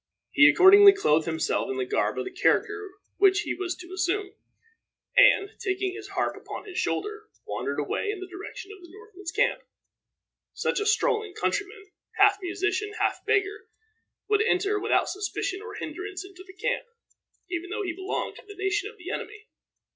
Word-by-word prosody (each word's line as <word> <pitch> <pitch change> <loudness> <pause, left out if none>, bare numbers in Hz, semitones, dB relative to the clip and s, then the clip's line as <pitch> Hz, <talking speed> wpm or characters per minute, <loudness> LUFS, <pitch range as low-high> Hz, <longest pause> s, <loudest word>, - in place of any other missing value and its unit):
He 295 -1 +7
accordingly 395 +2 +8
clothed 160 - +2
himself 160 -1 -1
in 130 - -3
the 130 - -1
garb 105 -2 0
of 130 - -2
the - - -6
character 420 -2 +1 0.3
which 390 0 +4
he - - -3
was 365 -2 -3
to 360 +1 -11
assume, 385 +1 -1 0.8
and, 415 -5 +6
taking 385 -3 -1
his 410 0 -8
harp 390 -2 -2
upon - - -8
his 370 -3 -5
shoulder, 425 +4 -3 0.2
wandered - - -3
away - - -2
in 415 -2 -3
the 375 - -6
direction 375 +1 -9
of 405 -2 -12
the 345 - -14
Northmen's 400 -2 -9
camp. - - +1 0.9
Such - - 0
a 420 - -1
strolling 435 -2 +1
countryman, 410 0 -3 0.2
half 400 0 +5
musician, 385 +3 -2
half 405 - 0
beggar 410 +1 0 0.6
would 420 0 +3
enter 415 -1 +1
without 430 +3 +1
suspicion 395 0 -3
or 435 -1 -8
hinderance 380 +1 -6
into 375 -1 -13
the 375 - -12
camp, - - -2 0.6
even 350 0 -3
though 425 +1 -3
he 355 -3 -3
belonged 375 +3 -4
to - - -14
the 410 - -10
nation 395 +1 -1
of 445 - -16
the 360 -1 -7
enemy. 425 0 -6
395 Hz, 175 wpm, -26 LUFS, 370-420 Hz, 0.9 s, accordingly